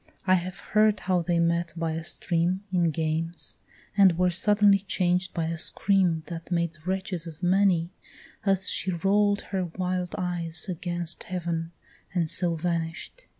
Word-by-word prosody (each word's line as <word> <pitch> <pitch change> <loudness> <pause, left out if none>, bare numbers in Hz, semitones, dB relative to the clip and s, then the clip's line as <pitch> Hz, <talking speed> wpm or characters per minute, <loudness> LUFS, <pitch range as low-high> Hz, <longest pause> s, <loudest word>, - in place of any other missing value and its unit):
I 185 - +4
have 185 +1 -1 0.2
heard 215 -1 +4
how 180 -1 +1
they 170 0 0
met 170 0 +1
by 165 -1 -1
a 160 +1 -4
stream 175 +3 0
In 175 -2 +3
games, 160 +1 -2 0.4
and 190 -4 +5
were 180 0 +3
suddenly 205 +2 +4
changed 180 -2 0
by 165 - -2
a 165 0 -3
scream 180 -3 +2
That 165 -1 -7
made 170 -1 -2
wretches 190 -3 -2
of 165 +2 -10
many, 180 -2 +3 0.5
as 195 -2 +1
she - - +2
roll'd 200 +3 +2
her 190 -2 0
wild 180 +1 -3
eyes 175 -2 -2
Against 175 -1 -3
heaven, 170 -2 -3 0.4
and 165 -3 +1
so 175 -2 +1
vanish'd. 165 - -3
175 Hz, 150 wpm, -27 LUFS, 165-190 Hz, 0.5 s, and